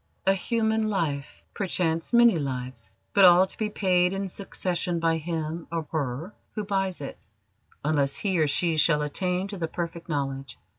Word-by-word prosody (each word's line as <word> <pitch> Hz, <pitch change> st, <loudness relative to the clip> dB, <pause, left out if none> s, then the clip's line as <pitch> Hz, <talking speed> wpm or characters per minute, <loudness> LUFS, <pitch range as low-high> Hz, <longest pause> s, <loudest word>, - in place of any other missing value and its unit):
"A 195 Hz, -, +5 dB
human 220 Hz, +2 st, 0 dB
life 150 Hz, -8 st, -2 dB
perchance 170 Hz, -4 st, -1 dB
many 235 Hz, -7 st, +6 dB
lives 125 Hz, -6 st, -5 dB, 0.2 s
but 200 Hz, -, +5 dB
all 180 Hz, 0 st, +8 dB
to 190 Hz, -, -9 dB
be 215 Hz, -1 st, 0 dB
paid 180 Hz, -3 st, +2 dB
in 195 Hz, 0 st, -3 dB
succession 175 Hz, -2 st, -2 dB
by 165 Hz, -1 st, +2 dB
him 160 Hz, 0 st, -4 dB
or 165 Hz, -2 st, -2 dB
her 155 Hz, +5 st, -3 dB, 0.2 s
who 215 Hz, -, -2 dB
buys 195 Hz, -4 st, -1 dB
it, 140 Hz, -, -7 dB, 0.7 s
unless 145 Hz, -3 st, +1 dB
he 190 Hz, -4 st, 0 dB
or 155 Hz, -, +3 dB
she 160 Hz, +3 st, +1 dB
shall 150 Hz, -1 st, +3 dB
attain 180 Hz, +5 st, -1 dB
to 200 Hz, -2 st, -6 dB
the 165 Hz, -, -1 dB
Perfect 170 Hz, 0 st, -5 dB
Knowledge." 135 Hz, -4 st, -3 dB
170 Hz, 165 wpm, -26 LUFS, 150-195 Hz, 0.7 s, all